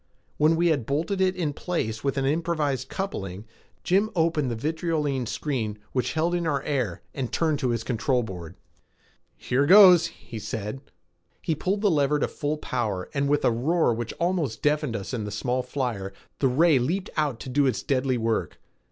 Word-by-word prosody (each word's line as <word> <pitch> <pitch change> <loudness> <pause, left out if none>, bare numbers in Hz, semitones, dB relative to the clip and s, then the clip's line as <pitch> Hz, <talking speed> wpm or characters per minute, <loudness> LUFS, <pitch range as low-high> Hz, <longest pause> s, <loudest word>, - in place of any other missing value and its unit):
When 155 +2 +4
we 170 +1 +2
had 140 -8 0
bolted 165 +7 -1
it 185 0 +2
in 160 -5 -1
place 110 -10 -3
with 140 0 -1
an 135 - +1
improvised 150 -4 0
coupling, 100 - -4 0.4
Jim 200 +4 +2
opened 160 -5 +1
the 120 - -2
vitriolene 150 -1 -1
screen 115 -6 -2
which 125 - -1
held 165 +2 +1
in 175 -1 0
our 140 -3 0
air 115 - -2
and 130 -4 -4
turned 155 -4 +1
to 130 -4 0
his 115 -1 -1
control 125 +1 0
board. 90 -6 -8 0.8
"Here 135 +3 +1
goes," 180 -3 +8
he 115 - -10
said. 105 +4 -5 0.6
He 165 - -1
pulled 190 +6 -1
the 205 -3 +3
lever 145 -1 +2
to - - 0
full 150 +1 -3
power 110 -10 -3
and 140 0 0
with 145 0 +2
a - - +4
roar 135 +4 +2
which 115 +1 -4
almost 170 -8 -1
deafened 150 -4 +1
us 100 +3 -5
in 115 -4 -2
the 105 - -4
small 125 +5 -1
flyer, 125 -7 -3 0.3
the 135 - +3
ray 150 +3 +4
leaped 180 +10 -2
out 145 -7 0
to - - -7
do 140 +2 +2
its 130 - -1
deadly 130 -2 +1
work. 115 -1 -1
140 Hz, 185 wpm, -26 LUFS, 120-165 Hz, 0.8 s, goes